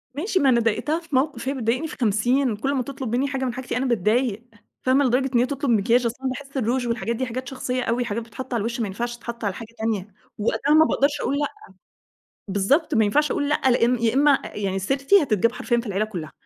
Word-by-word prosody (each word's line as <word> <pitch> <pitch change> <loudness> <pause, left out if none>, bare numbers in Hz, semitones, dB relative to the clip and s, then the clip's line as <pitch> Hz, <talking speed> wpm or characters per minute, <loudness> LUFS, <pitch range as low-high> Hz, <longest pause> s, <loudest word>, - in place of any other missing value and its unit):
ماشي، 375 +6 0
ما 275 - +4
أنا 240 -2 +4
ضايقتها 235 +8 0
في 330 -4 -6
موقف، 260 -2 0
هي - - 0
بتضايقني 255 +4 -1
في - - -9
خمسين. 240 +3 +2
كل 270 +7 -1
ما 260 -2 0
تِطلب 260 -3 -4
منّي 265 +3 +1
حاجة 270 -1 -2
من 245 - -2
حاجتي 260 -1 -4
أنا 260 - 0
باتضايق، 230 0 +1 0.4
فاهمة، 265 +2 +3
لدرجة 260 +2 +2
إن 235 - +5
هي 245 - +4
تُطلب 280 0 -3
مكياج، 230 +3 +3
أصل 230 0 -1
أنا 265 - -1
باحس 275 +2 -7
الروج 245 +1 0
والحاجات 235 0 -1
دي 260 +3 -2
حاجات 255 +1 -5
شخصية 255 -1 -3
أوي 240 +1 0
حاجات 225 +1 -3
بتتحط 245 +3 -8
على 235 - +1
الوش، 235 +4 -3
ما 225 - 0
ينفعش 240 +5 -4
تتحط 235 0 -7
على 200 -3 0
حاجة 230 +2 -10
تانية. 220 -3 -2 0.3
وقتها 255 +7 +1
ما 315 +1 +7
باقدرش 290 -1 +1
أقول 280 - 0
لأ. 290 - +1 1.0
بالضبط، 275 - +1
ما 220 - +4
ينفعش 295 +9 +2
أقول 285 -1 -1
لأ، 300 - +1
لأن 245 0 +3
يا 225 -1 +3
إما 280 +1 +4
يعني 195 -2 -3
سيرتي 275 - +3
هتتجاب 230 -2 +2
حرفيًا 245 -1 -1
في 235 - -6
العيلة 200 +1 0
كلّها، 175 -8 -7
245 Hz, 235 wpm, -23 LUFS, 225-275 Hz, 1.0 s, ما